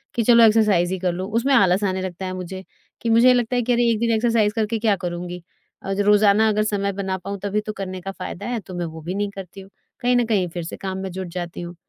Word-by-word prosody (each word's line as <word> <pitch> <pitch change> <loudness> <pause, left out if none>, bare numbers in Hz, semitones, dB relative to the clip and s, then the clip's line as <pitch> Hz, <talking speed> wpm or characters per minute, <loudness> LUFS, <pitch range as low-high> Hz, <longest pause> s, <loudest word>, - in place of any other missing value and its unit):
कि 235 - +1
चलो 235 +1 +6
एक्सरसाइज़ 210 -5 +4
ही 190 - -3
कर 180 -1 0
लो। 185 +2 -4
उसमें 270 +4 +1
आलस 195 -5 +4
आने 190 -1 0
लगता 185 0 -5
है 185 - -4
मुझे 185 +1 -6 0.4
कि 230 - -1
मुझे 235 +3 +6
लगता 245 0 0
है 245 - +2
कि 245 +1 +1
अरे 240 0 +3
1 220 - 0
दिन 235 0 +1
एक्सरसाइज़ 220 -2 +2
करके 220 0 -1
क्या 215 -2 +2
करूँगी। 175 0 -5 0.4
अ, 195 - -2
ज 195 - -4
रोज़ाना 210 +1 +4
अगर 215 0 +1
समय 200 -2 -1
बना 190 -1 -2
पाऊँ 200 +2 -6
तभी 205 +1 0
तो 215 0 -6
करने 185 -2 -6
का 195 +2 -5
फायदा 185 -2 -7
है 240 -1 -2
तो 190 -2 -11
मैं 175 -1 -2
वो 160 0 -8
भी 175 +4 -5
नहीं 205 0 -1
करती 195 0 -10
हूँ। 190 - -14 0.3
कहीं 245 0 +2
न 245 -1 +3
कहीं 205 -5 +1
फिर 175 0 -5
से 165 - -7
काम 190 -1 -5
में 190 0 -4
जुट 190 +1 -5
जाती 175 -1 -5
हूँ। 175 0 -7
200 Hz, 275 wpm, -22 LUFS, 185-220 Hz, 0.4 s, चलो